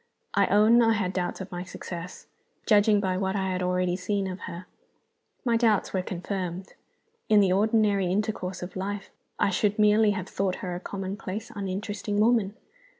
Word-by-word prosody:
I - - +3
own 215 +4 +5
I 225 -1 +4
had 195 -4 -1
doubts 180 0 -2
of 190 - -8
my 175 0 -4
success 180 -1 -8 0.4
judging 210 -1 +5
by 190 -2 0
what 190 0 -1
I 190 -1 -1
had 185 0 -2
already 180 0 +1
seen 195 +2 -1
of 185 0 -5
her. 175 +2 -8 0.8
My 235 -2 +3
doubts 225 -4 +2
were 190 - +1
confirmed. 185 0 -5 0.6
In 215 -1 +6
the 195 -2 +4
ordinary 205 -1 +2
intercourse 190 -1 -2
of 180 - -8
life 200 +1 -4 0.3
I 200 - +2
should 205 +2 +1
merely 210 0 +5
have 190 -3 -2
thought 190 -1 -1
her 180 - -3
a 175 - -4
commonplace, 195 +2 -5
uninteresting 205 +1 -3
woman. 215 -2 +3
195 Hz, 170 wpm, -27 LUFS, 185-210 Hz, 0.8 s, In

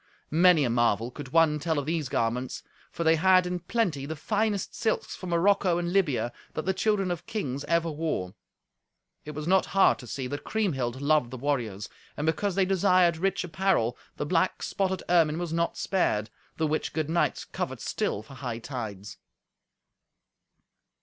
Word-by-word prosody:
Many 170 -1 +5
a 125 - +1
marvel 120 -1 +1
could 140 0 -8
one 155 0 +3
tell 160 +1 -1
of 145 - -1
these 155 -3 -1
garments. 120 +2 -1 0.3
For 170 - -3
they 160 0 +4
had, 185 +2 +5
in 180 0 -2
plenty, 175 -8 -1
the 160 - -4
finest 205 +5 -1
silks 220 - -1
from 185 - -7
Morocco 180 +1 +3
and 175 0 -2
Libya 145 -11 +1 0.2
that 155 - -3
the 190 - +1
children 195 -1 +1
of 175 0 -5
kings 140 - -3
ever 170 0 +1
wore. 150 - -3 0.9
It 150 0 -7
was 150 +1 -5
not 190 +1 +3
hard 195 - +5
to 125 - -10
see 130 +2 -4
that 145 +3 -5
Kriemhild 135 - -1
loved 150 -4 +3
the 130 - -7
warriors. 120 -7 -2 0.3
And 150 - -2
because 180 +4 0
they 195 -1 +3
desired 185 -3 +3
rich 190 +2 0
apparel, 175 -9 +1 0.2
the - - -2
black 170 +4 +1
spotted 190 -1 -1
ermine 165 -3 +3
was 175 -2 -3
not 170 0 0
spared, 110 - 0 0.3
the 160 - +1
which 155 +1 -1
good 155 -2 -1
knights 170 +2 0
covet - - -4
still 105 - -2
for 125 - -14
hightides. 115 -6 -6
160 Hz, 170 wpm, -27 LUFS, 130-185 Hz, 0.9 s, Many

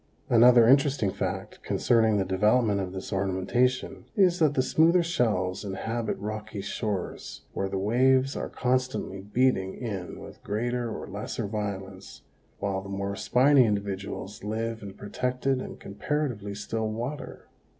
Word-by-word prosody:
Another 120 0 +7
interesting 135 -5 +4
fact - - -4
concerning 110 -3 +2
the 95 - +1
development 105 +2 +2
of 95 -1 -4
this 95 +1 -6
ornamentation 95 +7 0
is 185 -4 +4
that 150 -3 +3
the 130 - +3
smoother 165 +6 +4
shells 105 - 0
inhabit 110 +4 -3
rocky 105 0 -5
shores 100 -1 -4
where 95 - -2
the 95 - -2
waves 130 +6 +3
are - - -3
constantly 125 -6 -1
beating 105 -2 +1
in 100 -7 -5
with - - -12
greater 120 +3 -1
or - - -5
lesser 105 +3 -4
violence, 95 -7 -5 0.3
while 95 -1 -2
the 100 - -10
more 100 0 -3
spiny 130 +5 +4
individuals 100 -1 -4
live 115 +2 -3
in 100 -2 -8
protected 125 +5 -1
and - - -8
comparatively 105 -1 -3
still 110 +1 -3
water. 120 +7 -5
110 Hz, 140 wpm, -27 LUFS, 100-125 Hz, 0.3 s, Another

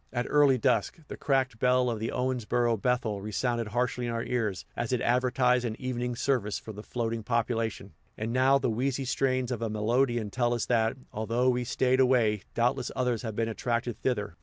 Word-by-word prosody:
At 120 -1 -1
early 145 -3 +5
dusk, 120 - +1
the - - -5
cracked 130 -4 0
bell 125 0 +3
of 115 -3 -1
the 110 - -2
Owensboro 120 -2 0
Bethel 110 -3 -1
resounded 115 +2 -1
harshly 120 +2 -1
in - - -2
our 115 0 -2
ears, 110 -7 -2
as 120 0 -3
it 125 - +1
advertised 125 +1 +2
an 115 -2 -4
evening 125 -1 -3
service 115 -5 0
for 110 - -9
the 105 - -8
floating 115 0 -3
population; 115 -1 -2 0.2
and 110 +2 -3
now 130 +2 +4
the 130 -3 0
wheezy 130 +4 -1
strains 130 0 0
of 120 -2 -3
a 115 - -1
melodeon 115 +1 0
tell 120 0 +1
us 120 - -2
that, 115 0 +1 0.2
although 115 +4 +1
we 125 0 +1
stayed 130 +1 +1
away, 120 -5 +3
doubtless 125 +2 0
others 125 -3 0
have 110 -3 -5
been 115 +1 0
attracted 120 +1 -2
thither. 105 -7 -1
120 Hz, 190 wpm, -28 LUFS, 115-125 Hz, 0.2 s, early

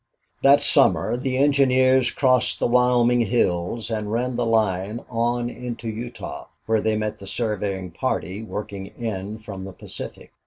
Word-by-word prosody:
8 - - -41
That 140 +1 +6
summer - - +4
the 130 +1 -2
engineers 130 -2 +4
crossed 130 -2 +2
the - - +1
Wyoming 125 0 +3
hills 110 -1 0
and 105 -2 -2
ran 125 +2 -1
the 120 -1 0
line 105 -1 0
on 120 +1 0
into 120 -2 -6
Utah, 120 +2 -7 0.2
where 110 -1 +1
they 110 0 +1
met 105 0 -3
the 100 - -10
surveying 100 -5 -2
party 100 -1 -3
working 105 -3 -6
in 105 -3 -5
from 100 -3 -8
the 95 0 -8
Pacific. - - -8
115 Hz, 155 wpm, -23 LUFS, 105-125 Hz, 0.2 s, That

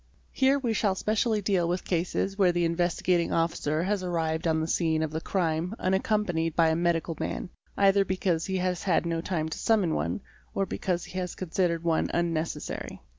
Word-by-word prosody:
Here 270 +1 +3
we 245 -5 -1
shall 205 -3 +1
specially 215 +1 0
deal 185 -4 +2
with 180 +1 -2
cases 180 +2 -1
where 190 -3 +4
the 175 0 +1
Investigating 175 +1 +1
Officer 165 -1 0
has 200 +1 0
arrived 165 -2 -1
on 160 -1 +2
the 160 - -1
scene 160 -2 +1
of 155 - -2
the 160 +1 -3
crime 170 +1 -1
unaccompanied 185 -4 0
by 165 -1 +4
a 160 - +2
medical 170 -1 0
man, 180 - -3 0.3
either 200 0 +5
because 185 -3 -1
he 190 -1 -1
has 180 -1 -1
had 175 -3 +1
no 165 -1 -1
time 165 -3 -2
to - - -5
summon 205 -7 +2
one, 80 +4 -1 0.3
or 195 - +1
because 180 -2 -2
he - - -12
__ - - +1
has 180 -1 -4
considered 170 -2 -1
one 165 -1 +1
unnecessary. 170 -1 -2
175 Hz, 190 wpm, -28 LUFS, 165-190 Hz, 0.3 s, either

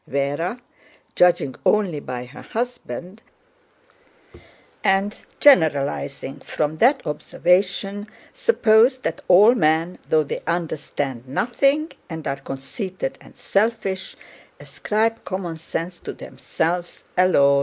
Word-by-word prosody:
Véra, 145 - -1 0.6
judging 175 -6 +3
only 195 -8 +2
by 125 -2 -6
her 125 +4 -12
husband 225 - -5 1.6
and 195 +2 +1 0.2
generalizing 145 - +3
from 155 +1 -2
that 260 - +3
observation, 195 +6 0 0.3
supposed 255 - +3
that 285 - -3
all 205 +6 +7
men, 165 -3 +1
though 155 -1 +4
they 140 - -5
understand 145 -6 -3
nothing 275 - +1 0.2
and 160 -2 -6
are 140 - -1
conceited 135 - -5
and - - -17
selfish, 200 -2 -1 0.4
ascribe 225 +2 -1
common 180 -4 -4
sense 165 +2 -5
to - - -7
themselves 175 +2 -3
alone. 140 -7 +5
180 Hz, 100 wpm, -22 LUFS, 150-215 Hz, 1.6 s, all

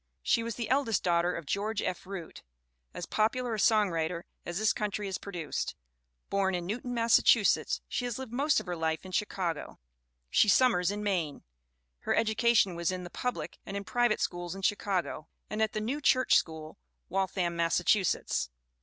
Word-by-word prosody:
She 230 - +3
was 230 -1 -4
the 235 -3 -3
eldest 260 -4 +1
daughter 175 0 +2
of 165 - -6
George 205 +6 -1
F. 185 0 -3
Root, 190 -4 -7 0.5
as - - -6
popular 235 +2 0
a 215 - -2
songwriter 175 -6 +2 0.2
as 175 0 -3
this 215 +1 +3
country 210 0 -2
has 190 -2 -3
produced. 175 -7 -4 0.5
Born 195 -1 +1
in 175 -1 -3
Newton, 245 +5 -3
Massachusetts, 230 0 +4
she 245 - -2
has 240 -3 -3
lived 260 -3 -7
most 285 +4 +3
of - - -8
her 180 -1 -3
life 160 +1 -2
in 185 - -8
Chicago. 180 -4 -2 0.5
She 210 - +5
summers 200 -7 +4
in 205 +1 -3
Maine. 175 -8 -1 0.6
Her - - 0
education 225 -3 +3
was 170 +1 -1
in 185 -1 -4
the 175 - -9
public 170 -11 -4
and 195 - -5
in 200 - -4
pri 240 +4 +2
vate 215 - 0
schools 175 0 -2
in 195 - -8
Chicago, 190 -6 -1 0.2
and 215 +1 -2
at 220 -1 +1
the 215 - -1
New 255 +8 -2
Church 255 -2 +4
School, 160 -1 -1 0.3
Waltham, 185 -2 -1
Massachusetts. 170 - +1
195 Hz, 180 wpm, -30 LUFS, 175-225 Hz, 0.6 s, She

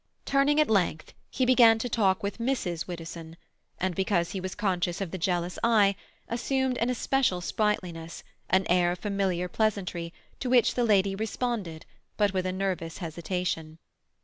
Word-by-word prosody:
Turning 280 +2 +3
at 305 - +4
length, 180 -7 0 0.2
he 255 - 0
began 240 -3 +6
to 225 - -3
talk 200 -6 +1
with 200 +2 -3
Mrs. 230 -9 -2
Widdowson, 165 -1 -8 0.4
and, 185 0 -1
because 175 -1 0
he 195 - -3
was 185 0 -5
conscious 185 -3 -1
of 195 -4 -4
the 190 - -4
jealous 175 0 -1
eye, 210 -4 +4 0.3
assumed 260 +2 0
an 235 - +1
especial 250 -5 +1
sprightliness, 175 -4 -2 0.3
an 190 0 +3
air 175 0 +3
of - - -7
familiar 190 -2 -1
pleasantry, 180 -4 -1 0.3
to 255 - -3
which 245 -2 +4
the 245 - +1
lady 200 -3 +3
responded, 210 -5 -3 0.3
but 205 -2 +2
with 185 -1 0
a - - -1
nervous 185 -3 -3
hesitation. 165 -2 -3
190 Hz, 160 wpm, -28 LUFS, 175-225 Hz, 0.4 s, began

